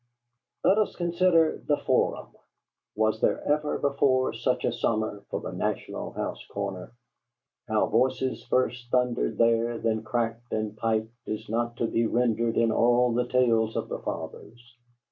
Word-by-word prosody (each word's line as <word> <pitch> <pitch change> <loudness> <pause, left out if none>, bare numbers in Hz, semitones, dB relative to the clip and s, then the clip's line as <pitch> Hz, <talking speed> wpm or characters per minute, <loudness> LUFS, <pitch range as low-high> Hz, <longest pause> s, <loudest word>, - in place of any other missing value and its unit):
Let 200 - +4
us 215 - 0
consider 170 -2 +2
the 145 - +1
Forum. - - 0 0.7
Was 110 +1 +1
there - - +2
ever 150 0 +1
before 140 -2 +2
such 125 +2 -1
a - - +2
summer 110 -3 -1
for - - -3
the - - -5
"National - - -3
House" - - -4
corner? 100 0 -5 0.7
How 110 -1 +2
voices 130 +2 0
first 125 -1 0
thundered 125 - +1
there, 115 0 +2
then 110 -1 0
cracked 115 +1 -3
and 110 -1 -2
piped, 110 0 -1
is 110 - -4
not 120 +1 -1
to 115 - 0
be 115 0 +1
rendered 115 -1 +1
in 115 -1 +3
all 120 +1 +3
the 125 +1 0
tales 115 -3 +2
of - - -3
the - - -4
fathers. 120 +1 -8
120 Hz, 150 wpm, -27 LUFS, 110-125 Hz, 0.7 s, Let